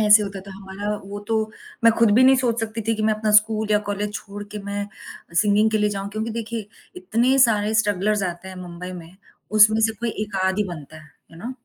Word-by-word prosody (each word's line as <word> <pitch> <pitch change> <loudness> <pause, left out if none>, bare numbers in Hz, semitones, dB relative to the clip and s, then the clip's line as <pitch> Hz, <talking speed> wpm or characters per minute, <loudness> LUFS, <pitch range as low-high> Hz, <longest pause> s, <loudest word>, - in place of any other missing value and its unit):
ऐसे 210 0 +6
होता 195 -1 -5
था 200 - -12
हमारा 195 +1 -7 0.2
वो 200 +1 -7
तो, 225 - +1 0.5
मैं 230 - +7
खुद 230 -2 +5
भी 255 - +6
नहीं 265 0 +6
सोच 240 -2 0
सकती 225 0 -4
थी 225 - +3
कि 215 - -3
मैं 215 0 +3
अपना 215 0 -1
स्कूल 215 0 +3
या 210 - +4
कॉलेज 205 +1 -2
छोड़ 205 0 -7
के - - -3
मैं 200 0 -3
अ, 200 -4 -15
सिंगिंग 210 +4 +3
के 215 - +1
लिए 210 0 +2
जाऊँ। 195 0 -4
क्योंकि 220 +2 -3
देखिए 225 -1 -5 0.3
इतने 265 -6 +1
सारे 220 -4 +3
स्ट्रगलर्स 210 -1 +1
आते 175 +2 -10
हैं 185 - -9
मुंबई 180 +1 -8
में, 175 +1 -11 0.3
उसमें 215 +1 +6
से 225 0 +2
कोई 235 -1 -1
1 205 -2 -7
आध 190 +2 0
ही 210 - +2
बनता 155 0 -11
है, 150 - -19 0.2
यू - - -13
नो। 255 - -4
210 Hz, 235 wpm, -22 LUFS, 200-220 Hz, 0.5 s, मैं